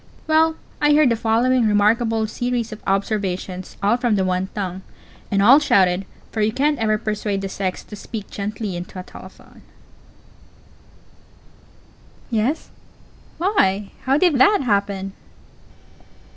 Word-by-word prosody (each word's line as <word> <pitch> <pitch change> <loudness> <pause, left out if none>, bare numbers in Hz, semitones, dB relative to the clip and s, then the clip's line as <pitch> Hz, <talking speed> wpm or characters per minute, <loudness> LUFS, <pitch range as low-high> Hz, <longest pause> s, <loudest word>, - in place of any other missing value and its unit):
Well, 315 0 +3 0.3
I 295 0 +4
heard 300 -3 +5
the 230 - +2
following 230 +2 +2
remarkable 220 +2 +2
series 240 +1 -2
of 215 - -9
observations, 195 -2 -2
all 210 +4 +3
from 240 -3 +1
the 190 -2 +1
one 185 +1 -1
tongue, 190 -2 -4 0.5
and 200 -1 +2
all 260 +7 +8
shouted 190 -8 +2 0.2
for 220 - -2
you 210 +1 +2
can't 290 +4 0
ever 215 -1 +1
persuade 210 -2 -2
the 195 - -3
sex 190 -1 -3
to 210 - -10
speak 210 0 -7
gently 205 -1 -4
into 175 +2 -7
a - - -6
telephone: - - -14 2.7
Yes? 235 +7 -1 0.7
Why, 210 - +1
how 270 +2 +3
did 350 0 +3
_that 405 +6 +4
_happen? 200 -3 0
215 Hz, 130 wpm, -21 LUFS, 195-250 Hz, 2.7 s, all